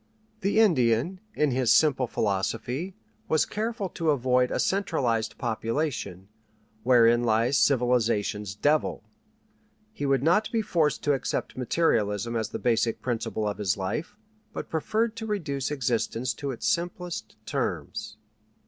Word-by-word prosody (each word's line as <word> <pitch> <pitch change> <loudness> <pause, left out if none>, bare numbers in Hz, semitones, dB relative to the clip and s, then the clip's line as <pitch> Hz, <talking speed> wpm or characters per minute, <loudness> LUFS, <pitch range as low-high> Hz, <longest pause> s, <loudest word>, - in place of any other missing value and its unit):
The 205 +2 +1
Indian, 155 - +3 0.2
in 150 -2 +2
his 125 -3 +2
simple 135 -5 +4
philosophy, 115 - -2 0.3
was 155 -1 +3
careful 220 -1 -3
to 165 -3 -2
avoid 125 -3 +2
a - - -2
centralized 135 - 0
population, 115 - -2 0.5
wherein 120 0 +5
lies 115 +4 +2
civilization's 115 -6 +1
devil. 145 +8 +1 0.9
He 145 -8 -3
would 135 -1 +2
not 180 +7 +3
be 225 -2 0
forced 160 -6 +1
to 145 - +3
accept 135 - -2
materialism 115 - 0
as 110 -1 -1
the - - -4
basic 115 -1 +1
principle 115 -3 -2
of 105 - -3
his 100 -1 0
life, 150 - -4 0.4
but - - -6
preferred 220 +8 0
to 225 -1 -5
reduce 145 -11 -2
existence 125 -3 -1
to 140 -2 -5
its 125 - -3
simplest 175 0 -2
terms. - - -3
130 Hz, 130 wpm, -27 LUFS, 115-165 Hz, 0.9 s, wherein